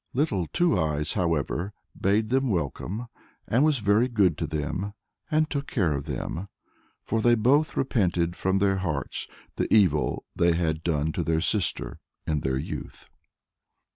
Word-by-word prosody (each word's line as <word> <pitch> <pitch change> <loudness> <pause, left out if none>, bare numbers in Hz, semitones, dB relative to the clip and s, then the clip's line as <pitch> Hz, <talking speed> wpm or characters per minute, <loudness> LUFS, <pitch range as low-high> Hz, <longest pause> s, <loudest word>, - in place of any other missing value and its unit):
Little 110 - +1
Two 175 - +2
Eyes, 75 -2 -1
however, 85 +1 -1 0.2
bade 105 +3 +1
them 130 +1 +2
welcome, 95 - -2 0.4
and 125 +5 +3
was 155 -2 +3
very 105 +2 +3
good 100 - +3
to - - -1
them, 80 +7 -3 0.3
and 155 0 +2
took 140 -2 -3
care 90 - +1
of 70 0 -3
them; 80 +6 -4 0.6
for 115 - -1
they 120 +1 +5
both 140 +8 +2
repented 90 -9 +1
from 95 +1 +1
their 95 -1 +2
hearts 85 -7 -3 0.3
the - - -1
evil 90 -9 +3
they 85 0 +3
had 80 -2 -1
done 80 -2 0
to 85 - -2
their 80 0 +1
sister 95 0 0 0.3
in 75 -2 0
their 65 -2 -1
youth. 65 - -6
95 Hz, 155 wpm, -26 LUFS, 80-115 Hz, 0.6 s, they